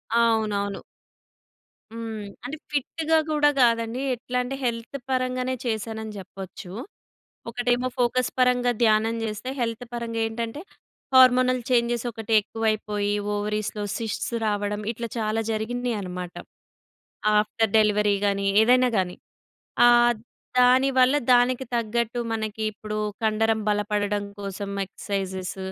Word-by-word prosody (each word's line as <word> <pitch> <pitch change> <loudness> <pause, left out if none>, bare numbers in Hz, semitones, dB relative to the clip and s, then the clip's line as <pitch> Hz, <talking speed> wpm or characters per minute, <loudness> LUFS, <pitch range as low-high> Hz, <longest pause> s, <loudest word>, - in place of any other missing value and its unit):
అవునవును. 215 -4 +1 1.1
హ్మ్. 225 -2 -5 0.2
అంటే 280 +5 -5
ఫిట్‌గా 315 +3 0
గూడా 295 -1 +4
కాదండి. 230 +1 +2
ఎట్లాంటే 250 +1 -3
హెల్త్ 235 +2 -2
పరంగానే 255 0 0
చేశానని 220 -1 -3
జెప్పొచ్చు. 190 -1 -9 0.8
ఒకటేమో 245 +1 0
ఫోకస్ 250 +1 +1
పరంగా 250 -1 +3
ధ్యానం 220 0 +3
చేస్తే, 215 +3 -4
హెల్త్ 230 0 -2
పరంగా 230 -1 -3
ఏంటంటే 230 +4 -4 0.5
హార్మోనల్ 255 -1 +6
చేంజెస్ 240 -1 +2
ఒకటెక్కువైపోయి, 215 -1 0 0.2
ఓవరీస్‌లో 210 0 -2 0.2
సిస్ట్స్ 225 +1 -3
రావడం 205 0 -1
ఇట్ల 235 0 -4
చాలా 215 0 0
జరిగినియన్నమాట. 215 -6 -3 1.0
ఆఫ్టర్ 215 +1 +1
డెలివరీ 210 -1 +3
గాని, 200 0 0 0.2
ఏదైనా 250 +2 +5
గాని. 180 -1 -1 0.7
ఆ! - - +8 0.7
దాని‌వల్ల 260 +1 +5 0.2
దానికి 245 +1 +3
తగ్గట్టు 235 +1 -1
మనకిప్పుడు 215 -1 -3 0.2
కండరం 220 0 +2
బలపడడం 205 0 0 0.2
కోసం 200 0 -5
ఎక్సర్‌సైజెస్, 190 -1 -4
225 Hz, 100 wpm, -25 LUFS, 210-245 Hz, 1.1 s, ఆ